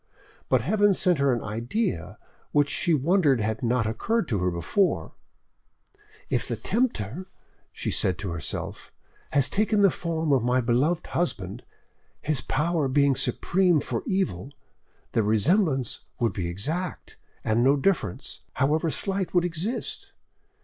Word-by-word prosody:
But - - +4
Heaven 205 -2 +3
sent 180 -5 +2
her 140 -1 +3
an 120 -2 -1
idea 115 - -2 0.4
which 145 -1 +3
she 175 - 0
wondered 155 -2 +3
had 110 0 -1
not 120 -1 +1
occurred 180 - 0
to 105 -5 0
her 90 -1 -1
sooner. 195 - +1 1.2
"If - - -1
the - - -2
Tempter," 185 - -1 0.4
she - - -3
said 90 -2 +2
to 95 -3 -4
herself, 85 -4 -5 0.4
"has 140 -1 +3
taken 210 +3 +1
the 195 - +6
form 160 -3 -1
of 130 - +3
my 125 +2 +2
beloved 130 +8 +1
husband, 105 - -2 0.6
his 145 -4 -1
power 155 +3 0
being 140 0 +3
supreme 180 +4 +2
for - - -3
evil, 185 - -1 0.6
the 115 - +2
resemblance 130 - +2 0.2
would 115 -2 +1
be 90 -3 -3
exact, 150 - -4 0.3
and 110 +2 +2
no 140 +3 +4
difference, 140 - -1
however 155 +5 +1
slight, 190 +2 -2
would 175 0 +4
exist. 175 +8 -4
140 Hz, 140 wpm, -26 LUFS, 115-180 Hz, 1.2 s, the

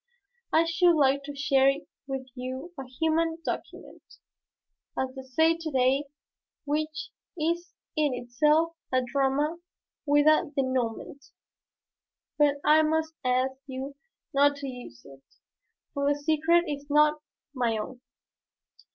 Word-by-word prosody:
I 320 - +5
should 335 +1 +4
like 280 -2 +3
to 290 0 -7
share 275 -1 +4 0.4
with 270 -1 -4
you 260 +6 -6
a 270 -3 -7
human 320 +4 0
document, - - -6 1.0
as 260 0 -1
they 265 - -7
say 320 +6 +2
to 330 -1 -5
day, 265 +1 +2 0.6
which 305 +1 -2 0.3
is 340 +2 -2 0.2
in 305 -2 +2
itself 300 +7 +2 0.2
a 255 0 +2
drama 280 +5 0 0.5
with 290 0 +4
a 310 +1 +4
dénouement. 260 +1 -2 1.1
But 290 -1 +4
I 305 +1 +6
must 320 +1 0
ask 255 +1 +1
you 265 +1 -5 0.4
not 285 +1 +4
to 280 -1 -6
use 245 - -10
it, 135 -1 -14 0.7
for 280 0 +1
the 290 - 0
secret 320 +3 +3
is 290 -3 -5
not 300 +1 +4 0.3
my 240 -4 0
own." 245 +4 -6
285 Hz, 125 wpm, -27 LUFS, 260-315 Hz, 1.1 s, I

